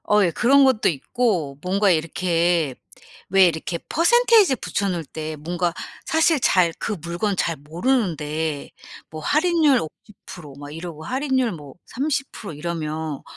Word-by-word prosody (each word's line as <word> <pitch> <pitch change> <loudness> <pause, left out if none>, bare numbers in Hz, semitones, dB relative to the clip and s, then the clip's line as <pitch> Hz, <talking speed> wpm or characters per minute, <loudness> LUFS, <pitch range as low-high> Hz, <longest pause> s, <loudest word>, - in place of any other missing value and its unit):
어 210 0 +4
예. 170 - +2
그런 275 +8 +4
것도 255 -4 +3
있고, 165 - -1
뭔가 195 +2 +2
이렇게 165 -2 +1 0.5
왜 190 0 +6
이렇게 170 +1 -2
percentage 440 - +4
붙여놓을 185 -7 -2
때 155 +2 -6
뭔가 170 +3 -2 0.3
사실 320 -1 +3
잘 180 -7 +3
그 215 - -3
물건 175 +4 -2
잘 165 -2 -1
모르는데 160 - -2 0.4
뭐 155 0 -7
할인율 305 - +3
50% 160 -3 -11
막 145 0 -9
이러고 165 -1 -8
할인율 260 - 0
뭐 145 -5 -10
30% 270 - -3
이러면 155 -1 -4
175 Hz, 270 characters per minute, -22 LUFS, 155-250 Hz, 0.5 s, 왜